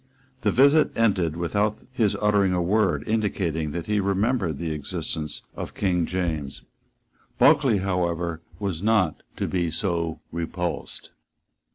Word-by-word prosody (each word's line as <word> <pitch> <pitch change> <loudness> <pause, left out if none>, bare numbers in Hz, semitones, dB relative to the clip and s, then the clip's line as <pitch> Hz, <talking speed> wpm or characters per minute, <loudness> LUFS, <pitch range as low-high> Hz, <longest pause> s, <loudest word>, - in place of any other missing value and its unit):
The - - +2
visit 140 +4 +5
ended 95 -8 +2
without 105 +5 0
his 115 -6 +1
uttering 100 -3 +3
a 90 - +1
word 100 +1 +1
indicating 95 -8 0
that 85 -1 -4
he 105 0 +1
remembered 100 - 0
the 85 0 -3
existence 75 0 -4
of - - -6
King 90 -4 +1
James. 80 -7 -3 0.7
Bulkeley, 130 -7 +5
however, 85 -3 -1 0.2
was 95 -5 -3
not 105 -6 +2 0.2
to - - -1
be 85 -3 0
so 85 -2 -2
repulsed. 85 +1 -4
90 Hz, 130 wpm, -25 LUFS, 85-105 Hz, 0.7 s, visit